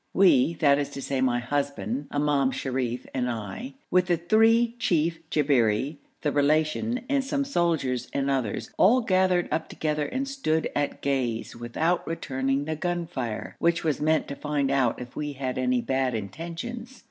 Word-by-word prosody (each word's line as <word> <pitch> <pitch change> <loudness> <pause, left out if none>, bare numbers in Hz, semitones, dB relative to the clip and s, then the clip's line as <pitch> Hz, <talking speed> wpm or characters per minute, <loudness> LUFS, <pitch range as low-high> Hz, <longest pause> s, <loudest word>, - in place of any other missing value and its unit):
We 170 -5 +5
that 145 -3 +4
is 145 - -2
to - - -4
say 135 -2 -1
my 125 -2 +2
husband, 140 - -2
Imam 145 -2 +2
Sharif, 130 -2 -2
and 125 -1 0
I 120 - -5 0.2
with 180 0 +3
the 175 -2 +2
three 225 +6 +4
chief 165 -5 +1
Jabberi, 135 -2 +2 0.2
the 150 - 0
Relation, 155 - +1
and 280 -1 +1
some 280 +1 -1
soldiers 165 - 0
and 140 -1 -1
others, 130 -6 -1
all 245 +7 +6
gathered 185 -4 +2
up 160 +1 -1
together 150 -1 -1
and 270 +1 -2
stood 215 -13 -1
at 145 0 -1
gaze, 130 -5 -1
without 155 +9 -1
returning 135 -3 -1
the 155 +1 -2
gun 175 +1 -2
fire, 125 -9 -5
which 170 0 +2
was 155 -3 0
meant 155 +1 +2
to 140 - -4
find 145 -2 -1
out 135 -4 +2
if 125 0 -9
we 150 -1 -3
had 130 -2 -3
any 125 -1 +1
bad 130 0 0
intentions. 170 - -6
150 Hz, 170 wpm, -26 LUFS, 130-175 Hz, 0.2 s, all